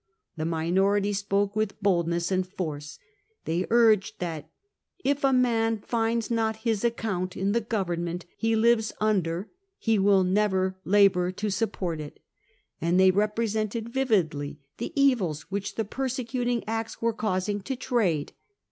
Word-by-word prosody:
The 155 -1 -3
minority 190 +5 +1
spoke 200 0 0
with 215 -1 -1
boldness 170 -3 +1
and 185 -1 +1
force. 155 -6 -5 0.5
They 170 +3 -1
urged 220 -3 +4
that 160 -4 -5 0.3
' 375 - -36
if 285 - -12
a 270 - +4
man 230 -3 +2
finds 230 +1 -1
not 225 -1 +1
his 225 -2 +1
account 210 -6 -1
in 195 +1 0
the 235 +2 +1
government 175 -6 -2
he 225 0 +1
lives 225 0 +3
under 190 -3 0 0.3
he 225 -2 +1
will 195 -1 +4
never 190 0 +1
labour 190 -2 +4
to 205 +2 -2
support 185 -6 -2
it,' 145 - -9 0.6
and 170 +3 +2
they 190 0 +7
repre 210 +4 +1
sented 220 +1 -2
vividly 180 - 0 0.2
the 235 - -3
evils 205 - +2
which 200 0 -3
the 225 - -1
persecuting 245 0 -2
Acts 225 0 -3
were 230 0 +1
causing 205 -1 -1
to 265 +7 -4
trade. 215 - 0
205 Hz, 150 wpm, -27 LUFS, 180-225 Hz, 0.6 s, they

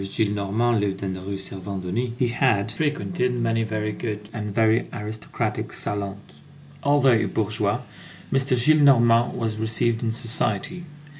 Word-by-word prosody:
Gillenormand 105 +3 0
lived 100 -1 -2
in 95 -1 -2
the 95 - -6
Rue 100 +1 -4
Servandoni, 95 +4 -4
he 125 -2 +1
had 115 -4 +1
frequented 145 0 -1
many 115 -1 +1
very 110 -1 -2
good 105 -1 -5
and 105 -2 -4
very 110 +3 +2
aristocratic 110 -1 -4
salons. 100 -1 -3 0.6
Although 140 -2 +4
a 110 -2 +3
bourgeois, 105 0 -1 0.5
M. - - +2
Gillenormand 125 -3 +4
was 110 -2 -2
received 110 +1 0
in 115 - 0
society. 120 - -1
110 Hz, 135 wpm, -24 LUFS, 105-120 Hz, 0.6 s, Although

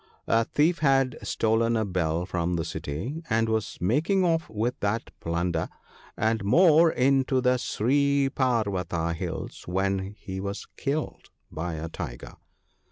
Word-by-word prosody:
A 115 0 +2
thief 155 +6 +2
had 135 -4 +3
stolen 115 +1 +1
a 110 - 0
bell 85 -3 -1
from 90 -1 -1
the 80 -1 -2
city, 80 - -4
and 115 0 +2
was 110 -1 -1
making 160 - +2
off 165 -1 +1
with 115 +3 -2
that 105 +3 -2
plunder, 85 0 -1 0.5
and 110 -1 +1
more, 165 - +6
into 130 0 +2
the 125 0 +3
Sri 140 +4 +1
parvata 100 - 0
hills, 80 -2 -6
when 95 +2 -1
he 95 -2 -6
was 100 +1 -4
killed 145 +2 -3 0.2
by 85 +1 -4
a 80 +1 -4
tiger. - - -7
110 Hz, 140 wpm, -26 LUFS, 90-135 Hz, 0.5 s, more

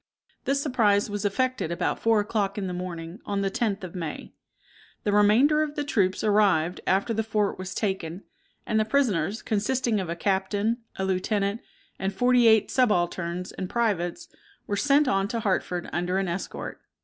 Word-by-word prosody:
This 275 +1 +1
surprise 220 -8 +2
was 205 0 -3
effected 250 -3 0
about 170 +1 -1
four 225 -1 +3
o'clock 205 -1 -1
in 200 - -2
the 180 - -3
morning 175 0 -6
on 200 -1 -2
the 195 -1 0
10th 210 -4 -1
of 180 - -7
May. 165 -5 -6 0.7
The 205 - +1
remainder 220 +9 +5
of 300 -1 -2
the 295 - -1
troops 195 -9 0
arrived 195 -5 +2
after 195 +5 +2
the 220 - 0
fort 210 -3 -1
was 185 -1 -6
taken, 190 -3 -2 0.4
and 220 - +1
the - - +4
prisoners, 215 - 0
consisting 225 +1 0
of 185 -3 -4
a 170 - -2
captain, 200 +5 0 0.2
a 190 - -2
lieutenant, 200 +3 0 0.4
and 190 +1 -1
forty 245 +1 +4
eight 220 -1 +4
subalterns 180 -6 0
and 185 -1 -5
privates, 200 -8 -1 0.4
were 205 - -2
sent 285 +6 +3
on 195 -3 +1
to 230 +1 -3
Hartford 185 -3 -1
under 180 +2 0
an 195 -1 0
escort. 175 +2 -5
200 Hz, 175 wpm, -26 LUFS, 185-225 Hz, 0.7 s, remainder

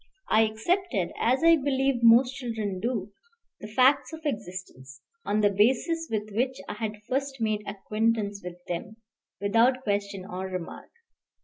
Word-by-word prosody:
I 220 - +5
accepted, 220 - -1
as 255 +6 +2
I 330 0 +7
believe 270 -3 0
most 235 +3 +6
children 225 -7 -4
do, 215 -2 -2 0.5
the 210 - -8
facts 255 +4 +3
of 320 - -7
existence, 185 - -6 0.3
on 210 +1 +1
the 205 -1 +4
basis 265 - +2
with 215 -1 -3
which 255 +5 -1
I - - -4
had 210 0 -5
first 270 0 -2
made 215 -2 0
acquaintance 210 0 -1
with 180 0 -9
them, 175 +5 -5 0.4
without 230 +6 +3
question 200 -3 -2
or 190 -1 -5
remark. 185 -2 -7
220 Hz, 145 wpm, -27 LUFS, 200-260 Hz, 0.5 s, I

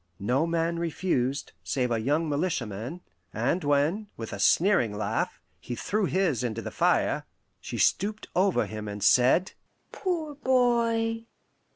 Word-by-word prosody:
No 130 +10 +1
man 170 0 0
refused, 145 -6 -1
save 125 -3 -1
a 115 - +1
young 150 +7 +1
militiaman; 140 - -2 0.3
and 135 +11 0
when, 145 +9 +1
with 115 -1 -6
a 100 - -5
sneering 160 - +3
laugh, 110 - -2 0.2
he 120 - -6
threw 210 - -1
his 175 - +1
into 115 -2 -3
the - - -5
fire, - - +1 0.3
she - - -6
stooped 210 +3 +1
over 190 +1 +3
him 110 -1 -6
and 105 0 -5
said, 130 +10 +4 0.4
"Poor 330 -6 -2
boy! 235 -4 +1
165 Hz, 140 wpm, -27 LUFS, 120-205 Hz, 0.4 s, said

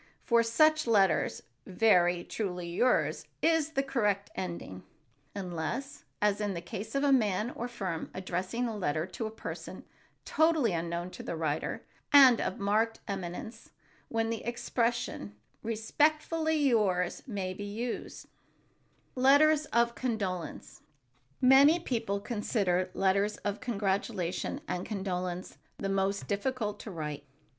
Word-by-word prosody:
For 235 -1 +4
such 310 +6 +3
letters 195 -6 +2 0.2
"Very 180 -3 +3
truly 180 -5 -4
yours" 240 +9 +1 0.2
is 320 -1 +2
the 275 - +1
correct 210 -7 0
ending, 170 - -5 0.5
unless, 200 - -4 0.2
as 210 0 +2
in 205 -2 -1
the - - -3
case 210 +6 -7
of 275 - +1
a 285 - +4
man 215 -3 +2
or 240 - -4
firm 190 -9 -4
addressing 185 +6 -2
a 225 - -4
letter 155 -5 -1
to 220 +4 -5
a - - -5
person 220 - -7 0.4
totally 315 - +3
unknown 170 +1 -3
to - - -8
the - - -4
writer, 155 -2 -2 0.3
and 265 -5 +8
of - - -2
marked 215 +3 +1
eminence, 200 +4 -6 0.4
when 225 0 -1
the 230 - -4
expression 235 - -2 0.3
"Respectfully 310 +8 +1
yours" 210 - +2
may 195 -5 -3
be 205 - -7
used. 225 +4 -4
[Sidenote: 255 - -13
LETTERS 300 +3 +6
OF 235 -2 +2
CONDOLENCE] 200 -9 -4 0.6
Many 275 +6 +7
people 225 - -2
consider 200 -4 0
letters 195 +2 +2
of 205 0 -1
congratulation 200 - -2
and 180 - -2
condolence 185 -3 -4 0.2
the 195 - -3
most 195 0 0
difficult 210 0 -2
to - - -8
write. 150 -5 -5
210 Hz, 130 wpm, -30 LUFS, 185-245 Hz, 0.6 s, and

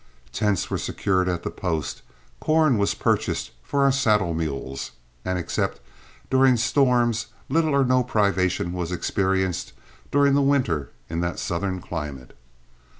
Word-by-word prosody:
Tents 105 -4 0
were - - 0
secured 95 -1 0
at 85 -1 -2
the - - -3
post; 80 -5 -3 0.4
corn 155 -7 +3
was 100 - +1
purchased - - 0
for 140 - 0
our 140 - +5
saddle 105 -10 +2
mules; 70 -5 -4 0.3
and 95 0 -1
except 85 - -2 0.5
during 130 -1 +5
storms 125 -2 +2 0.2
little 155 0 +2
or 140 -1 +4
no 130 0 +3
privation 95 -6 +1
was 90 -1 -3
experienced 95 0 -1 0.4
during 140 0 +4
the 140 - +4
winter 130 - +1 0.2
in 85 +1 -3
that 85 0 -2
southern 95 +2 -2
climate. 75 -8 -6
100 Hz, 140 wpm, -24 LUFS, 85-130 Hz, 0.5 s, our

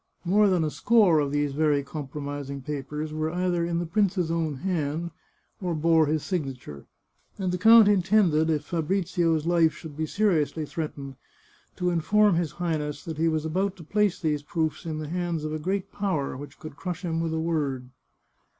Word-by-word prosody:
More 205 +4 +4
than 180 -3 +2
a 155 - -1
score 205 -7 +4
of 145 -2 0
these 145 -1 0
very 150 -1 +2
compromising 140 -1 -6
papers 150 +2 -4
were 155 0 -1
either 175 0 0
in 170 0 -1
the 175 - -1
prince's 180 -1 +1
own 160 -3 -1
hand 165 0 -2 0.5
or 175 -3 -1
bore 160 0 +3
his 155 0 0
signature, 135 - -5 0.5
and 185 -2 -1
the 180 - -2
count 225 +1 +8
intended, 185 -5 +3
if 150 -2 0
Fabrizio's 165 -1 0
life 170 -2 +3
should 160 -4 -10
be 155 +1 -2
seriously 165 -7 +1
threatened, 140 -4 -6 0.6
to 180 -1 0
inform 200 +5 +3
his 165 -3 -1
Highness 155 -3 -3
that 160 -2 -5
he 165 - +3
was 155 -1 0
about 190 +5 -1
to 170 - -12
place 205 +3 +1
these 150 -3 0
proofs 160 +2 -2
in 155 -1 -3
the 155 -1 -5
hands 170 -1 -2
of 155 - -3
a 155 - -3
great 190 +4 -2
Power 165 -11 -2
which 140 0 -9
could 155 -3 -10
crush 180 +3 -5
him 165 -1 -1
with 165 -1 -1
a - - -1
word. 145 -6 -2
160 Hz, 185 wpm, -26 LUFS, 150-180 Hz, 0.6 s, count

